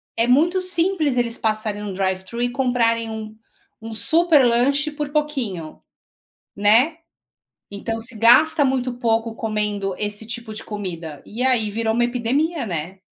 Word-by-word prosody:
é 230 +1 +2
muito 325 +9 +3
simples 345 -5 +2
eles 235 -1 0
passarem 215 -1 -1
num 205 -2 -5
drive-thru 190 +4 -3
e 245 - 0
comprarem 240 -3 +1
um 220 -1 -7 0.5
um 225 0 -7
super 315 +7 +4
lanche 280 +6 +2
por 295 -1 -4
pouquinho, 260 - -3 0.8
né. 225 +10 +4 0.7
Então 225 +3 -4
se 235 +2 -6
gasta 290 +7 +5
muito 260 -1 -1
pouco 230 -2 -1
comendo 210 -3 -2
esse 210 +1 -3
tipo 235 -1 -6
de 215 - -7
comida. 170 -8 -7
E 230 +4 -6
aí, 245 -5 +2
virou 220 +1 -1
uma 240 +1 +2
epidemia, 255 +5 -1
né? 175 +1 -5
230 Hz, 145 wpm, -21 LUFS, 210-265 Hz, 0.8 s, gasta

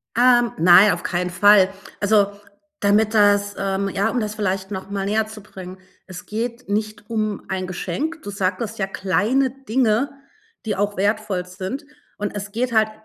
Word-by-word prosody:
Ähm, 240 -1 +4
nein, 180 +5 +7
auf 175 - -3
keinen 180 0 -1
Fall. 195 +1 +5 0.3
Also, 205 -1 +3 0.5
damit 210 +2 +2
das 205 -1 +3
ähm, 195 0 -1
ja, 200 +4 0
um 250 - -1
das 215 -1 -3
vielleicht 190 -2 -2
noch 190 0 -6
mal 195 -1 -2
näherzubringen, 210 -3 -4 0.3
es 185 -1 -10
geht 235 +2 -4
nicht 210 0 -3
um 215 -3 -2
ein 185 -1 -2
Geschenk. 310 - -4
Du 205 - -7
sagtest 200 +3 -2
ja 195 - 0
kleine 215 +8 +1
Dinge, 255 0 0 0.5
die 210 - -1
auch 205 +1 -1
wertvoll 200 -2 0
sind. 190 - -6 0.3
Und 205 0 -4
es 200 0 -5
geht 240 +3 -1
halt 220 -1 +3
205 Hz, 160 wpm, -21 LUFS, 195-220 Hz, 0.5 s, nein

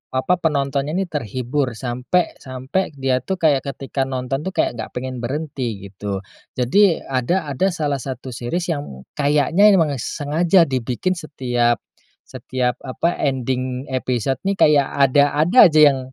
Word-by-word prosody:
apa, 130 +7 +2
penontonnya 145 -1 -1
nih 190 -2 -2
terhibur 130 0 -2
sampai 125 +9 -1
sampai 130 +6 -3
dia 130 -2 0
tuh 190 +10 -3
kayak 155 -6 +3 0.2
ketika 135 0 -3
nonton 130 0 -3
tuh 190 - -5
kayak - - +2
nggak 110 - -5
pengen 130 0 -4
berhenti 120 -6 -4
gitu. 100 0 -5 0.3
Jadi 165 +9 +3
ada 135 +5 -1
ada 165 +8 +1
salah 145 -4 -1
satu 130 0 -6
series 165 +10 -3
yang 145 - -6 0.2
kayaknya 150 +7 +4
memang 150 -7 +1
sengaja 165 - +2
dibikin 130 +4 -2
setiap 125 -8 -1 0.4
setiap 125 -1 -3
apa 170 +7 -1
ending 130 -1 -1
episode 130 0 -1
nih 200 - +1
kayak 145 -6 +4
ada 140 +1 +3
ada 200 +4 +7
aja 155 -1 +2
yang 135 - -3
135 Hz, 145 wpm, -20 LUFS, 125-155 Hz, 0.4 s, ada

